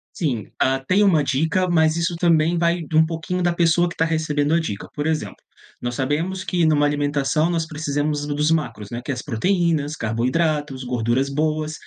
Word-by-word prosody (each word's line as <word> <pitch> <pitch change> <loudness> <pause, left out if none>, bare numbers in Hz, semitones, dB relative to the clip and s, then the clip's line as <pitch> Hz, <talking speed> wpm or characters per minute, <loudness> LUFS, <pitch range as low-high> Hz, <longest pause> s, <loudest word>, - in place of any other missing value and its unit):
Sim, 130 - -2
hã, 135 0 +1
tem 200 +3 +4
uma 170 -7 +4
dica, 160 +7 0
mas 160 -2 +3
isso 170 +1 -1
também 165 -1 +2
vai 170 +1 +1
de 160 0 -5
um 160 +1 +6
pouquinho 165 +2 -3
da 175 0 +2
pessoa 170 0 +3
que 175 - -6
está 165 - +1
recebendo 155 -2 0
a - - +3
dica. 105 -12 -5
Por 145 - -2
exemplo, 155 - -2 0.5
nós 120 0 -3
sabemos 160 +9 -1
que 180 -3 -1
em 160 - +4
uma 145 0 +3
alimentação 145 +2 0
nós 165 -2 -1
precisamos 150 -1 -2
dos 150 +1 0
macros, 115 -10 -2
né, 120 - -5
que - - -2
é - - 0
as 125 - -5
proteínas, 155 - 0
carboidratos, 135 +4 -1
gorduras 125 +2 0
boas. 155 +2 -1
155 Hz, 195 wpm, -22 LUFS, 140-165 Hz, 0.5 s, um